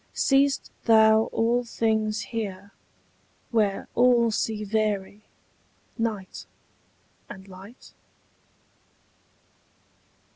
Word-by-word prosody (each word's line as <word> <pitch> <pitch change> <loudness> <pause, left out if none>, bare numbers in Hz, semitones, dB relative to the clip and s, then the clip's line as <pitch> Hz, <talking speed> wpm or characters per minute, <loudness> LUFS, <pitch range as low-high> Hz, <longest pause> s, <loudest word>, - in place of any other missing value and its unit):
Seest 275 0 +1
thou 220 -1 +5
all 235 +2 0
things 220 -2 -1
here, 200 -4 -6 0.8
where 210 -4 0
all 240 -1 +3
see 215 0 -2
vary 210 -1 -2 0.7
Night 220 -5 -4 0.8
and 190 -1 -11
light? 195 +6 -14
220 Hz, 70 wpm, -25 LUFS, 205-230 Hz, 0.8 s, thou